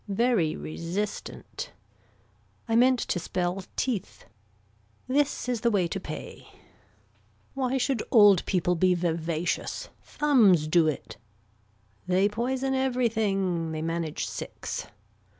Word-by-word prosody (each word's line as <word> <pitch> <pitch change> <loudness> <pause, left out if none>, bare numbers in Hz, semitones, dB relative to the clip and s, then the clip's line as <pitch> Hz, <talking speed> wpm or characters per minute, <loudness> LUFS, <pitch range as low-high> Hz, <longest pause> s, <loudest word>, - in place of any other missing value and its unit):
Very 205 -6 +1
resistant. 175 +6 -5 0.9
I 225 - +1
meant 255 +2 +5
to 175 - -1
spell 180 +2 -2
teeth. 235 -8 -3 0.8
This 280 0 +1
is 245 -3 -1
the 235 - +3
way 195 -6 +2
to 195 - -3
pay. - - -8 1.1
Why 265 -1 0
should 260 -2 0
old 205 -5 +6
people 180 -1 +1
be 180 +1 +3
vivacious. 170 - -2
Thumbs 220 - +3
do 160 0 +4
it. 155 - -4 0.9
They 185 +2 +3
poison 255 +5 -1
everything. 215 -10 0
They 155 0 -3
manage 165 -1 -2
six. - - -6
195 Hz, 110 wpm, -27 LUFS, 170-250 Hz, 1.1 s, old